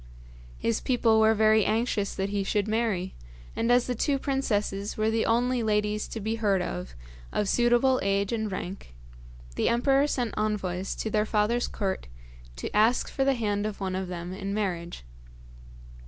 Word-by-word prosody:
His 115 - -1
people 230 -3 +3
were 220 0 +5
very 215 0 +4
anxious 215 -2 0
that 195 +1 -2
he 200 -1 -1
should 205 +1 0
marry, 215 -5 -1 0.4
and 230 +1 +1
as 245 0 +4
the 250 - -1
two 275 +4 0
princesses 210 -7 -1
were 215 +1 +1
the 225 0 +1
only 245 +2 +2
ladies 210 -1 0
to 225 - -6
be 220 +2 -2
heard 205 -4 +2
of 90 - -5 0.4
of 210 - 0
suitable 240 +3 +3
age 200 +2 0
and 220 -2 -2
rank, 185 - -6 0.6
the - - +1
emperor 270 +4 +3
sent 245 -6 -2
envoys 195 -3 -2
to 220 - -3
their 215 0 +1
father's 220 +3 +1
court 190 - -3 0.5
to - - -6
ask 220 +4 +3
for 270 - 0
the 270 0 +2
hand 210 -3 -1
of 210 - -6
one 190 -2 -2
of 190 0 -3
them 175 0 -6
in 195 +1 -4
marriage. 175 - -3
215 Hz, 170 wpm, -27 LUFS, 195-235 Hz, 0.6 s, were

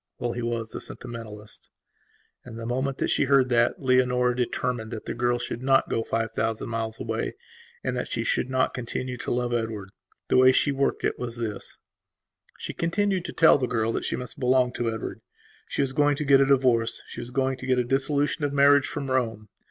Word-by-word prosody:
Well, 120 - -2
he 120 - -4
was 115 -1 -3
a - - -5
sentimentalist. 110 -3 -8 0.7
And 115 -2 -10
the 115 - -6
moment 130 +3 -1
that - - 0
she - - +2
heard 135 -2 +4
that, 120 +2 +2
Leonora 125 -1 +3
determined 125 -2 -2
that 110 -2 -7
the - - -3
girl 120 0 +1
should 120 0 -5
not 135 0 +3
go 115 - +1
five 115 0 -2
thousand 110 0 -2
miles 115 -1 -3
away 115 0 -3 0.5
and - - -1
that - - -2
she - - -2
should 125 - 0
not 130 0 +1
continue 125 +1 -4
to - - -5
love 120 0 0
Edward. 110 -4 -3 0.4
The - - +3
way 130 0 +7
she 145 - +2
worked 140 0 0
it - - -1
was 120 -1 -4
this: 110 -4 -5 0.8
She - - -6
continued 190 +1 0
to - - -4
tell 160 -3 +6
the 125 - 0
girl 115 -2 0
that - - -2
she - - -1
must 125 -2 -7
belong 125 -1 +3
to 120 -1 -1
Edward; 110 - -5 0.5
she - - 0
was 135 -1 -2
going 145 +1 +3
to 150 - -3
get 135 -1 +6
a - - +5
divorce; 125 -4 +2
she - - -8
was 120 0 -6
going 130 +1 0
to 130 - -8
get 130 -1 +3
a 125 - +2
dissolution 140 +4 0
of 145 - +1
marriage 140 0 +5
from 135 -2 -4
Rome. 115 -5 -1
125 Hz, 215 wpm, -26 LUFS, 115-135 Hz, 0.8 s, way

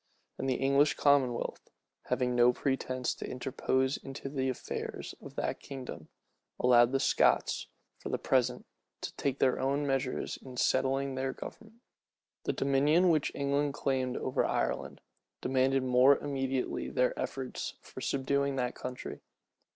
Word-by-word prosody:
And 135 - -1
the 130 - +2
English 140 +3 +3
commonwealth, 135 -4 +1 0.4
having 125 -1 0
no 120 0 +6
pretence 130 -1 -1
to - - -7
interpose 130 +1 0
in 135 - -9 0.2
the 130 -2 0
affairs 130 - -5
of - - -11
that - - -2
kingdom, 125 - -8 0.5
allowed 120 -1 +6
the 135 - +2
Scots, - - +2 0.3
for - - -6
the - - 0
present, - - +1 0.4
to - - -5
take 140 -1 -1
their 130 -2 +2
own 140 +2 0
measures 135 -2 -1
in 130 -2 -10
settling 135 +2 +1
their 130 0 -2
government. 225 +1 -10 0.6
The - - +1
dominion 145 +6 +3
which 155 -3 +2
England 140 +1 0
claimed 130 -3 0
over 130 - 0
Ireland, - - -1 0.4
demanded 130 +1 +2
more 130 +2 +6
immediately 135 -2 -2
their 125 0 +2
efforts 130 -1 -4
for - - -10
subduing 140 0 0
that 125 -2 -1
country. 125 0 -6
135 Hz, 140 wpm, -31 LUFS, 130-140 Hz, 0.6 s, no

